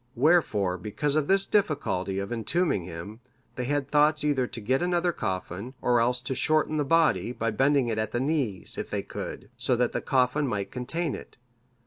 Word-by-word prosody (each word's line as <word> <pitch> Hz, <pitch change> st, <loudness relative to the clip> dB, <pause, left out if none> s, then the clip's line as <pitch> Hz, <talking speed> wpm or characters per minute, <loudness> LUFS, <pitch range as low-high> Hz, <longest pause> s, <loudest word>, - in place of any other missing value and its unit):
Wherefore 115 Hz, -, +2 dB
because 140 Hz, -, -2 dB
of 155 Hz, -2 st, +1 dB
this 195 Hz, 0 st, +3 dB
difficulty 145 Hz, -, 0 dB
of 100 Hz, +4 st, -3 dB
entombing 115 Hz, -, 0 dB
him, 90 Hz, +6 st, -8 dB, 0.3 s
they 125 Hz, -, -4 dB
had 145 Hz, +1 st, -1 dB
thoughts 150 Hz, 0 st, +3 dB
either 140 Hz, -4 st, +1 dB
to 115 Hz, -, -6 dB
get 130 Hz, +5 st, 0 dB
another 175 Hz, 0 st, +1 dB
coffin, 95 Hz, -, -4 dB
or 120 Hz, -1 st, +2 dB
else 125 Hz, +1 st, +1 dB
to 130 Hz, +2 st, -2 dB
shorten 155 Hz, +3 st, +1 dB
the 150 Hz, -, +2 dB
body, 140 Hz, -, +2 dB
by 115 Hz, -2 st, -2 dB
bending 135 Hz, +3 st, +2 dB
it 110 Hz, -2 st, -1 dB
at 110 Hz, -, -2 dB
the 120 Hz, -, -1 dB
knees, 130 Hz, -, -1 dB
if -, -, -4 dB
they -, -, -2 dB
could, 105 Hz, -, -7 dB
so 125 Hz, 0 st, +1 dB
that 120 Hz, 0 st, +1 dB
the -, -, -2 dB
coffin 135 Hz, +2 st, +1 dB
might 100 Hz, -4 st, -3 dB
contain 150 Hz, +6 st, -2 dB
it. -, -, -9 dB
125 Hz, 190 wpm, -27 LUFS, 110-150 Hz, 0.3 s, this